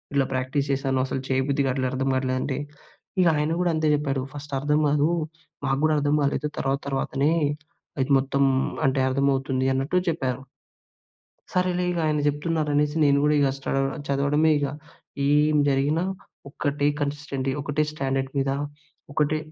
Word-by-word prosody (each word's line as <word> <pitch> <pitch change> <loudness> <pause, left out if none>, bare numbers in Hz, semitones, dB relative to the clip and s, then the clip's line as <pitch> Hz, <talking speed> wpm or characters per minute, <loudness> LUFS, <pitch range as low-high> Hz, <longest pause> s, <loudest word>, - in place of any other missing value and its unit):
ఇల 140 - +4
ప్రాక్టీస్ 130 +2 -1
చేశాను. 135 -1 0
అసలు 135 0 -3
చేయబుద్ధిగాట్లే, 135 0 +1
అట్లా - - +1
అర్థం 135 +1 -1
గాట్లే 130 0 0
అంటే, 135 -2 -2 0.6
ఇహ 180 - +4
ఆయన 150 +1 0
కూడా 180 -1 +2
అంతే 155 0 +1
చెప్పాడు 140 -2 -1
"ఫస్ట్ 145 0 -8
అర్థం 150 +2 +1
కాదు. 145 +2 +2 0.6
మాకు 135 0 +1
గూడా 155 0 +4
అర్థం 145 0 +2
కాలేదు. 140 +1 0
తర్వాత 135 0 0
తర్వాతనే, 135 +1 0 0.7
అది 130 +1 0
మొత్తం 140 +1 0 0.4
అంటే 130 0 +1
అర్థమవుతుంది" 135 -1 +1
అన్నట్టు 135 +7 0
చెప్పారు. 135 -5 -2 1.1
సరేలే 180 0 +1
ఇగాయన 155 -3 0
చెప్తున్నారనేసి, 150 -1 0
నేను 140 -1 +4
గూడా 150 0 +3
ఇగ 140 -1 +4
స్టడౌ 135 0 -1 0.3
చదవడమే 140 +3 +2
ఇగ. 145 - 0 0.6
ఏం 150 +1 +4
జరిగినా, 140 +5 +1 0.5
ఒకటే 145 0 0
కన్‌సిస్టెన్టీ, 140 -2 -2
ఒకటే 145 +1 0
స్టాండర్డ్ 135 -2 -2
మీద, 135 0 +1 0.6
ఒకటే 150 +1 +1
140 Hz, 140 wpm, -25 LUFS, 135-150 Hz, 1.1 s, ఇల